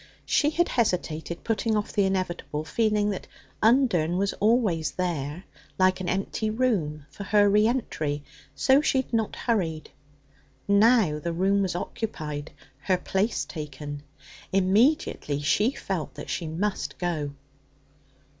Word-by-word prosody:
She 295 - +3
had 345 +3 +1
hesitated, 170 -7 -1
putting 225 0 0
off 210 - -3
the 200 - +3
inevitable, 185 -5 -2
feeling 210 +3 +1
that 195 - -6 0.3
Undern 215 - +3
was 200 +1 0
always 210 -8 +2
there, 170 -2 -3 0.3
like 185 0 +3
an 180 - -2
empty 195 +3 -1
room, 195 - 0
for 200 - -8
her 205 +1 +4
re 210 +2 +4
entry, 155 - -2 0.3
so 265 - +4
she 270 -3 +2
had 240 - -25
not 225 -2 0
hurried. 170 -10 -1 0.8
Now 200 -6 +4
the 170 +2 -3
room 195 +4 +2
was 185 -3 -1
occupied, 155 -7 -4 0.3
her 185 -2 +1
place 195 +5 -1
taken. 145 -2 -7 0.5
Immediately 195 - +2
she 200 - +3
felt 185 - -4
that - - -7
she 170 - -2
must 190 +6 -2
go. 155 -5 -2
190 Hz, 135 wpm, -26 LUFS, 160-220 Hz, 0.8 s, her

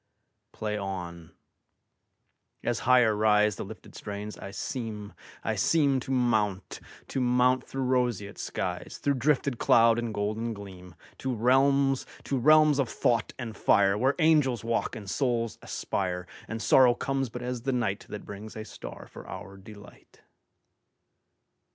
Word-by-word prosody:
Play 105 -1 -3
on! 90 -4 -6 1.3
As 120 -1 0
higher 125 -4 +6
riseThe 105 -1 +2
lifted - - -11
strains, 105 +1 -6
I - - -8
seem, 105 0 -5 0.3
I - - 0
seemTo 140 -6 +2
mount, 110 -7 0 0.3
to 135 - -1
mount 125 +1 +3
through 135 0 -4
roseate 125 -6 0
skies, - - -4
Through 140 - +1
drifted 140 -2 +1
cloud 115 0 +5
and 120 -1 -3
golden 110 +2 -2
gleam, 90 -4 -11 0.2
To 130 - -2
realms, 135 +3 +3 0.2
to 135 - -1
realms 155 +2 +5
of 130 -4 +1
thought 115 -2 0
and 120 -4 -6
fire, 100 0 +3
Where 130 +6 +2
angels 150 -8 +3
walk 115 +2 -1
and 105 -3 -8
souls 115 -1 -1
aspire, 90 -2 -3 0.2
And 115 0 -5
sorrow 125 -2 +6
comes 135 0 -2
but 125 +2 -7
as 125 -1 -3
the 135 +3 -1
nightThat 105 -4 -3
brings 105 +2 -9
a 110 0 -6
star - - -9
for - - -12
our 100 - -8
delight. 100 +1 -15
115 Hz, 140 wpm, -28 LUFS, 105-130 Hz, 1.3 s, higher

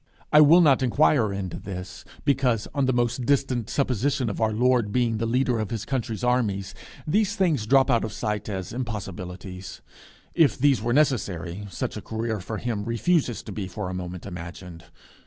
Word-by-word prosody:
I 150 - +9
will 160 +4 +7
not 140 -6 +5
inquire 130 -3 +3
into 95 -3 -4
this, 95 -1 -7 0.2
because, 130 -6 +1
on 140 -2 +1
the - - +3
most 120 0 0
distant 130 -5 +1
supposition 130 -2 0
of 100 - -6
our 110 -1 +2
Lord 120 -1 +2
being 120 -1 +1
the 115 - -1
leader 125 0 +1
of 110 -3 -2
his 115 -3 -4
country's 120 -4 -3
armies, 105 -6 0 0.3
these 205 +5 +1
things 165 - +1
drop 135 +2 +4
out 115 - +3
of 110 - -3
sight 105 -1 -3
as 95 -2 -5
impossibilities. 95 -6 -6 0.5
If 160 -4 +3
these 135 -3 +3
were 120 +2 -1
necessary, 100 - 0
such 95 - -4
a - - -6
career 110 -1 -3
for 110 +4 -5
him 110 -3 -3
refuses 120 +3 0
to 110 - -8
be 95 -1 -4
for 95 -1 -5
a - - -5
moment 90 -1 -6
imagined. 90 -2 -9
115 Hz, 180 wpm, -25 LUFS, 100-130 Hz, 0.5 s, I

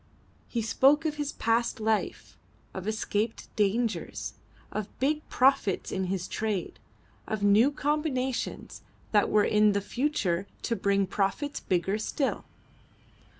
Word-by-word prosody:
He 230 -2 -2
spoke 275 +7 +4
of 300 -1 -1
his 295 -1 -2
past 230 +1 0
life, 220 0 -1 0.4
of 190 +1 -6
escaped 215 0 -2
dangers, 220 +3 -1 0.4
of 215 -1 -5
big 300 +4 0
profits 255 -7 +2
in 190 0 -1
his 185 0 -2
trade, 215 -4 -3 0.5
of 215 -2 -3
new 205 +6 +6
combinations 285 -3 -2 0.3
that 210 -2 +3
were 210 -1 +4
in 210 -1 +4
the 200 - +1
future 200 - -1 0.2
to 230 - 0
bring 200 -2 +2
profits 200 +10 -1
bigger 190 +3 0
still. 270 +5 -2
220 Hz, 125 wpm, -28 LUFS, 200-265 Hz, 0.5 s, new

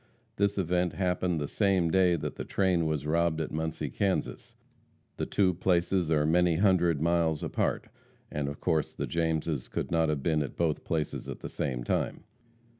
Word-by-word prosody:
This 100 0 +1
event 90 -1 +1
happened 90 -2 0
the 75 - -2
same 95 -4 +1
day 90 -1 +4
that 80 - -4
the - - -5
train 90 -4 +1
was 75 -2 -2
robbed 85 +1 +1
at 80 - -3
Muncie, 80 0 -3
Kansas. 100 -2 -2 0.6
The - - -2
two 95 -3 +2
places 90 -1 +1
are 75 -2 +2
many 85 +1 +3
hundred 85 -4 +3
miles 85 -2 +1
apart, - - -1 0.4
and 75 -1 -2
of 70 - -7
course 80 -4 0
the - - -2
Jameses 80 -4 -1
could - - -3
not 80 -1 +2
have 75 -3 -1
been 80 -2 +2
at 70 - -5
both 80 -3 0
places 80 -3 -2
at - - -7
the - - -6
same 65 -4 -3
time. - - -1
85 Hz, 180 wpm, -29 LUFS, 80-90 Hz, 0.6 s, day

